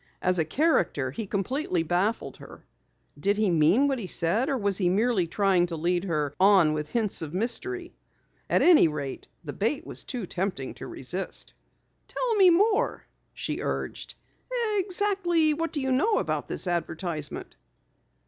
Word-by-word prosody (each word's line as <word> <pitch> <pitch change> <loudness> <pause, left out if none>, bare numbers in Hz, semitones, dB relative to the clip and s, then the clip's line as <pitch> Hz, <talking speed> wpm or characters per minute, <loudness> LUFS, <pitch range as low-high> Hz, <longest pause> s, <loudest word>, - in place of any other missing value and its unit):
As 180 -1 +2
a 160 - +2
character 160 - +1
he 205 +9 -5
completely 200 - -1
baffled 180 +7 -1
her. - - -13 0.6
Did 200 +1 +1
he 210 -3 +2
mean 170 - +4
what 270 -2 -1
he 200 - -5
said 180 +10 0
or 275 - 0
was 200 -4 0
he 180 -3 +2
merely 200 -1 +1
trying 185 0 +2
to 170 - -4
lead 175 +3 -1
her 150 -5 -1
on 190 -5 +5
with 150 -1 -4
hints 215 -4 +1
of 160 +1 -6
mystery? 345 - -2 0.6
At - - +3
any 340 - +7
rate, 145 -3 -5 0.2
the 145 -3 -6
bait 230 +8 -1
was - - -2
too 245 -6 -4
tempting 180 -7 -3
to - - -9
resist. 180 +9 -2 0.5
"Tell - - -1
me 390 -4 +6
more," 405 +5 +2 0.3
she - - -4
urged. - - -4 0.6
"Exactly 365 -4 +1
what 330 +2 -3
do 300 - -1
you 265 -1 -1
know 415 - +2
about - - -2
this - - -3
advertisement?" 165 -3 -3
200 Hz, 160 wpm, -26 LUFS, 170-285 Hz, 0.6 s, any